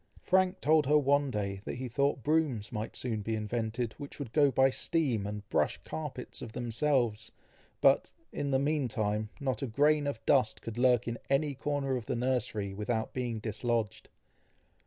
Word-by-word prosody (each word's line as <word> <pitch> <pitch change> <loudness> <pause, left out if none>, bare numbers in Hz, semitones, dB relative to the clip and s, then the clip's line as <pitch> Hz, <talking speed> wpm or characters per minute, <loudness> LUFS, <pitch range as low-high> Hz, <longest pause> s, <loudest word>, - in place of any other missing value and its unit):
Frank 185 0 +2
told 155 -1 +4
her 150 +1 +5
one 140 0 +3
day 100 -4 -3
that - - -4
he 130 +1 -4
thought 140 +1 0
brooms 145 -9 +1
might 110 0 -4
soon 115 -4 -2
be 110 +2 -2
invented, 110 +1 -2
which 140 - -8
would 130 -6 -6
go 145 -2 +5
by 135 0 +4
steam 130 -9 0
and 105 -1 -6
brush - - +1
carpets 145 -5 -6
of 110 - -7
themselves, 120 -2 0 0.5
but, - - +4 0.2
in 140 - -2
the 135 - +3
meantime, 115 -7 0
not 130 -6 -2
a 135 - -1
grain 145 +5 +3
of 140 -6 -2
dust 130 -6 +3
could 115 +1 -5
lurk 125 -2 +4
in 115 0 -3
any 140 +1 +2
corner 135 0 -1
of 115 - -7
the - - -1
nursery 115 -5 -1
without 110 +2 -2
being 120 -3 -2
dislodged. 110 0 -2
125 Hz, 175 wpm, -31 LUFS, 110-140 Hz, 0.5 s, her